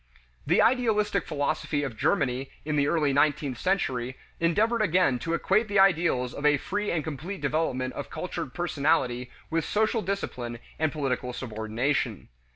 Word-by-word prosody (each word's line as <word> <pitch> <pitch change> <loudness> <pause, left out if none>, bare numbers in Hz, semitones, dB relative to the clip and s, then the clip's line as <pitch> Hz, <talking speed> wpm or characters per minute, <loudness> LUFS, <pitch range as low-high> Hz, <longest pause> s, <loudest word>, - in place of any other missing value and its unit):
The - - +5
idealistic 210 -5 +2
philosophy 145 0 -1
of 135 -5 -4
Germany 125 +4 0 0.2
in 155 -1 -1
the 145 -1 +2
early 150 -3 +2
nineteenth 145 -2 +1
century 130 -10 -1 0.2
endeavored 215 +8 +2
again 180 -9 +3
to 165 +5 -1
equate 215 +6 +2
the 200 -1 0
ideals 170 -10 +3
of 140 - -7
a 150 0 +5
free 205 +8 -2
and 160 -3 0
complete 160 +6 -5
development 130 -5 0
of - - -6
cultured 130 - -4
personality 140 -7 0 0.2
with 165 0 +1
social 220 +5 +1
discipline 125 - -3 0.2
and 160 -1 +1
political 130 -4 -2
subordination. 115 +1 -2
150 Hz, 150 wpm, -27 LUFS, 130-185 Hz, 0.2 s, The